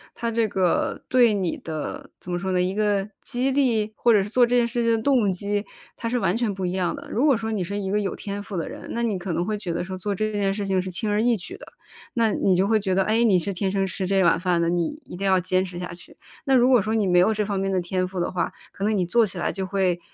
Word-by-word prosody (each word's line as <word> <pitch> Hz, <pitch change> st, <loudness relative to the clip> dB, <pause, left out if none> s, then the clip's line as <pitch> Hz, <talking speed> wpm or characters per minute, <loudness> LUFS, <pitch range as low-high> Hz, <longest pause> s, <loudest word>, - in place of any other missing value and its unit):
它 235 Hz, -1 st, -2 dB
这 225 Hz, -1 st, +1 dB
个 185 Hz, -4 st, 0 dB
对 245 Hz, -4 st, +5 dB
你 190 Hz, -5 st, -1 dB
的 155 Hz, -2 st, -6 dB
怎 180 Hz, -, -8 dB
么 175 Hz, -, -1 dB
说 190 Hz, +1 st, -2 dB
呢， 180 Hz, -, +1 dB
一 185 Hz, +1 st, 0 dB
个 205 Hz, -1 st, +1 dB
激 255 Hz, +2 st, 0 dB
励？ 230 Hz, -6 st, +1 dB
或 235 Hz, -, +3 dB
者 205 Hz, -2 st, +4 dB
是 200 Hz, -, -7 dB
做 245 Hz, +3 st, +4 dB
这 245 Hz, +1 st, 0 dB
件 240 Hz, -1 st, +4 dB
事 240 Hz, 0 st, -2 dB
情 230 Hz, -, +2 dB
的 -, -, 0 dB
动 245 Hz, -8 st, +3 dB
机， 205 Hz, +3 st, -2 dB, 0.3 s
它 230 Hz, -, -4 dB
是 245 Hz, -, 0 dB
完 185 Hz, -, +1 dB
全 230 Hz, -2 st, 0 dB
不 190 Hz, -1 st, -4 dB
一 175 Hz, -, -1 dB
样 185 Hz, -2 st, -1 dB
的。 -, -, -10 dB
如 245 Hz, +6 st, +1 dB
果 285 Hz, -4 st, +5 dB
说 225 Hz, -1 st, -4 dB
你 205 Hz, -4 st, -1 dB
是 200 Hz, +4 st, -4 dB
一 190 Hz, -1 st, -3 dB
个 210 Hz, -, +2 dB
有 200 Hz, -, -2 dB
天 200 Hz, 0 st, -5 dB
赋 205 Hz, -1 st, -8 dB
的 165 Hz, -, -2 dB
人， -, -, -9 dB
那 235 Hz, -, -1 dB
你 215 Hz, -4 st, 0 dB
可 180 Hz, -1 st, -4 dB
能 175 Hz, +2 st, -1 dB
会 215 Hz, +1 st, -1 dB
觉 190 Hz, -4 st, -4 dB
得 170 Hz, -, -2 dB
说 185 Hz, +1 st, -6 dB
做 200 Hz, +2 st, -2 dB
这 215 Hz, +2 st, -1 dB
件 200 Hz, -2 st, 0 dB
事 200 Hz, -1 st, -3 dB
情 190 Hz, -1 st, +1 dB
是 185 Hz, -, -5 dB
轻 195 Hz, +4 st, -1 dB
而 210 Hz, +1 st, +2 dB
易 240 Hz, 0 st, +3 dB
举 180 Hz, -, -8 dB
的， -, -, -12 dB, 0.5 s
那 230 Hz, -3 st, +2 dB
你 190 Hz, -2 st, +2 dB
就 190 Hz, +2 st, +2 dB
会 220 Hz, 0 st, +3 dB
觉 190 Hz, -2 st, -1 dB
得， 195 Hz, -, +3 dB
诶， 220 Hz, +4 st, +2 dB
你 195 Hz, -5 st, +5 dB
是 200 Hz, +3 st, -1 dB
天 190 Hz, +1 st, -1 dB
生 195 Hz, -1 st, +1 dB
吃 190 Hz, 0 st, -3 dB
这 195 Hz, 0 st, +3 dB
碗 170 Hz, -1 st, +4 dB
饭 180 Hz, -1 st, +1 dB
的， 170 Hz, -, +1 dB
你 175 Hz, -, -1 dB
一 -, -, -9 dB
定 195 Hz, +2 st, -2 dB
要 190 Hz, -1 st, +4 dB
坚 185 Hz, +1 st, +1 dB
持 180 Hz, -1 st, -8 dB
下 180 Hz, -1 st, -5 dB
去。 175 Hz, -, -13 dB, 0.3 s
那 270 Hz, -2 st, +3 dB
如 250 Hz, 0 st, +5 dB
果 250 Hz, -5 st, +5 dB
说 220 Hz, +3 st, -1 dB
你 215 Hz, -3 st, +2 dB
没 180 Hz, -1 st, +4 dB
有 220 Hz, +5 st, +4 dB
这 210 Hz, 0 st, 0 dB
方 200 Hz, -1 st, -2 dB
面 195 Hz, 0 st, -1 dB
的 185 Hz, -, +1 dB
天 185 Hz, +1 st, -1 dB
赋 185 Hz, 0 st, -5 dB
的 175 Hz, -, -1 dB
话， 180 Hz, -, -1 dB, 0.2 s
可 195 Hz, -, -7 dB
能 215 Hz, 0 st, +1 dB
你 180 Hz, -, +1 dB
做 230 Hz, +5 st, +3 dB
起 185 Hz, -3 st, -6 dB
来 -, -, -1 dB
就 190 Hz, -1 st, -3 dB
会， 185 Hz, -2 st, 0 dB
195 Hz, 330 characters per minute, -24 LUFS, 185-220 Hz, 0.5 s, 对